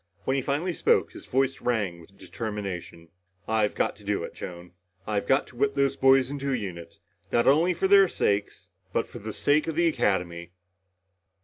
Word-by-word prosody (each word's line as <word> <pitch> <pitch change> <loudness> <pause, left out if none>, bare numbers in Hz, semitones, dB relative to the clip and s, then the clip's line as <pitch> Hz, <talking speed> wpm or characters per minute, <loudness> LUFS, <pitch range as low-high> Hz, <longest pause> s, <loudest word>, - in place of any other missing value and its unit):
When 130 - +1
he 135 - +1
finally 150 +7 -1
spoke, - - +2
his - - -12
voice 135 +1 0
rang 105 -8 -1
with 100 +4 -19
determination. 95 -7 -6 0.4
"I've 110 -2 +1
got - - 0
to 105 - -16
do 100 -3 -1
it, - - -7
Joan. 90 0 -9 0.3
I've 105 -2 -2
got 135 +1 +3
to - - -16
whip 140 +2 0
those 140 -1 +2
boys 135 0 +4
into 140 -1 -3
a - - +1
unit. 85 -6 -7 0.3
Not 120 - +2
only 165 +6 +4
for 190 - +1
their 195 0 +7
sakes 100 - -1 0.2
but - - 0
for - - -10
the - - -6
sake 150 +2 +1
of 160 - -2
the 170 +1 +2
Academy!" 90 - -1
120 Hz, 190 wpm, -26 LUFS, 95-140 Hz, 0.4 s, their